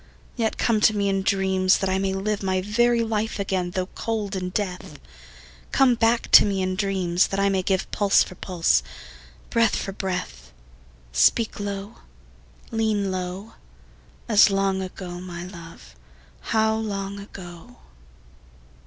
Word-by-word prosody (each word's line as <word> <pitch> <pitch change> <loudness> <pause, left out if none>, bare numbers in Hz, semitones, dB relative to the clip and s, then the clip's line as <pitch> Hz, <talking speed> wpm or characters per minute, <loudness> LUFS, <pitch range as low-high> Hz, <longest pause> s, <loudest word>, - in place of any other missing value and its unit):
Yet 225 -2 -1
come 220 -3 +1
to 215 0 +4
me 200 -1 +1
in 195 0 0
dreams, 190 -1 +2
that 195 - -2
I 190 0 0
may 195 0 0
live 200 +2 -2
My 190 -1 0
very 235 +4 +2
life 220 -1 -2
again 190 -3 -1
though 185 +1 -2
cold 210 0 -4
in 180 -1 -3
death: 180 -6 -4 0.7
Come 265 -2 +4
back 230 0 +1
to - - +10
me 195 -2 -1
in 185 0 -1
dreams, 185 -3 +1
that 195 - -3
I 200 0 +3
may 190 -1 +1
give 190 0 -1
Pulse 200 -1 +3
for - - -10
pulse, 170 - +1 0.7
breath 230 -2 +3
for 195 - -3
breath: 180 - -5 0.6
Speak 65 - +2
low, 200 +1 -5 0.7
lean 215 -3 0
low, 185 +3 -5 0.7
As 215 -3 +6
long 195 -1 0
ago, 180 -1 -7
my 175 -2 -7
love, 165 - -12 0.5
how 220 0 +2
long 200 -2 -4
ago! 175 -4 -11
195 Hz, 145 wpm, -24 LUFS, 185-210 Hz, 0.7 s, to